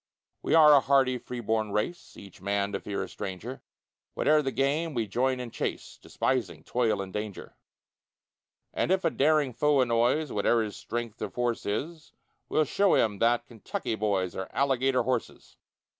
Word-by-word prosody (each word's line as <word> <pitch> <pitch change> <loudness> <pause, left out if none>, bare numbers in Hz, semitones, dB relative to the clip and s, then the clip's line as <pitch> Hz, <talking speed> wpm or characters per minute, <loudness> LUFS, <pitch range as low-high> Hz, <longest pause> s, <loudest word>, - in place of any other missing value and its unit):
We - - +1
are 155 -2 +8
a 145 - +8
hardy 135 -2 +2
free 125 0 -7
born 110 -1 -1
race, 105 +12 -3
Each 100 -3 -13
man 100 +1 -1
to 100 - -2
fear 100 - -4
a - - -6
stranger; 100 +7 -7 0.5
Whate'er 155 0 +3
the 135 -2 -2
game, 145 +4 0
we 115 -2 0
join 130 +5 0
in 125 -2 -6
chase, - - -5
Despising 95 -12 -2
toil 110 -3 0
and 95 -1 -10
danger: 105 -2 -6 1.2
And - - -1
if 190 0 +1
a - - +3
daring 145 -2 +2
foe 150 +3 +2
annoys, 125 +5 +2
Whate'er 110 +3 +2
his 105 -2 -6
strength 115 -2 -5
or - - -2
force 120 -1 -2
is, 155 +10 -4 0.4
We'll 155 - +2
show 200 +4 +3
him 105 -3 +1
that 120 +1 +2
Kentucky 115 -1 -5
boys 100 -5 -1
Are 95 - -5
Alligator 135 -1 +2
horses. 125 -1 -4
120 Hz, 170 wpm, -28 LUFS, 105-135 Hz, 1.2 s, are